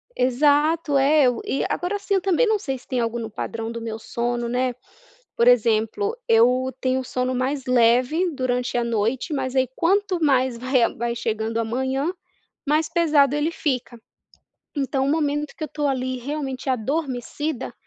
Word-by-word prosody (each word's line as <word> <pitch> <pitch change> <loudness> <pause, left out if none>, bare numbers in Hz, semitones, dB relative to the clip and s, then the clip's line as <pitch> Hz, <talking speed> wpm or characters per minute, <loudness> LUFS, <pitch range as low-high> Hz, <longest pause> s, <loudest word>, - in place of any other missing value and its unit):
Exato, 290 +4 +2
é 285 +2 +4
eu 245 -2 +2
e 275 - -1
agora 360 +3 -2
assim, 405 0 -2
eu 385 - +3
também 385 +4 +2
não 430 -1 +2
sei 270 -6 -3
se 250 - -20
tem 255 -2 -1
algo 230 0 -1
no 225 -1 -5
padrão 225 +1 -4
do 230 0 -6
meu 225 -1 -4
sono, 240 +1 -2
né, 250 +1 0 0.6
por 235 - +2
exemplo 235 - +2
eu 250 +3 +4
tenho 260 0 +1
o 255 - -9
sono 255 +1 -1
mais 265 +2 -1
leve 255 +8 +3
durante 250 -2 -1
a 240 - +1
noite 235 +6 -1
mas 265 -2 -2
aí 260 -1 +3
quanto 375 -1 +1
mais 260 -3 +2
vai 255 +1 +2
a - - +3
vai 235 0 -3
chegando 225 -1 -2
a - - +1
manhã 265 +7 -1 0.6
mais 305 +1 +2
pesado 300 -4 +3
ele 295 +2 0
fica. 250 -6 -2 0.8
Então 270 -1 0
o - - +1
momento 295 -1 -1
que 315 - -4
eu 305 - -6
tô 295 +1 -2
ali 255 -1 -2
realmente 270 0 -4
adormecida, 270 +2 -3
260 Hz, 180 wpm, -23 LUFS, 240-295 Hz, 0.8 s, é